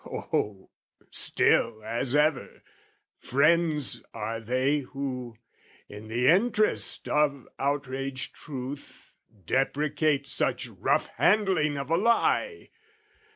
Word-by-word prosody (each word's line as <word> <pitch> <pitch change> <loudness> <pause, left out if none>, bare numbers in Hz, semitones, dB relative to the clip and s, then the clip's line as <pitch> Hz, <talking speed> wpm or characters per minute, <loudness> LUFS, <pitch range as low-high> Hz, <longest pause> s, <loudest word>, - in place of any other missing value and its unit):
O, 100 -2 -3 0.4
still 110 -2 +2
as 120 +4 -1
ever, 150 -3 0 0.6
friends 150 -3 +2
are 115 +1 -3
they 130 +6 0
Who, 130 -3 -5 0.5
in 105 +1 -10
the 120 +3 0
interest 210 +4 +2
of 145 -3 +1
outraged 135 -2 -2
truth 140 -1 -9 0.3
Deprecate 145 - 0
such 140 - -1
rough - - 0
handling 185 -9 +3
of 140 +2 -5
a 165 - +4
lie! 235 - +1
140 Hz, 95 wpm, -27 LUFS, 125-150 Hz, 0.6 s, a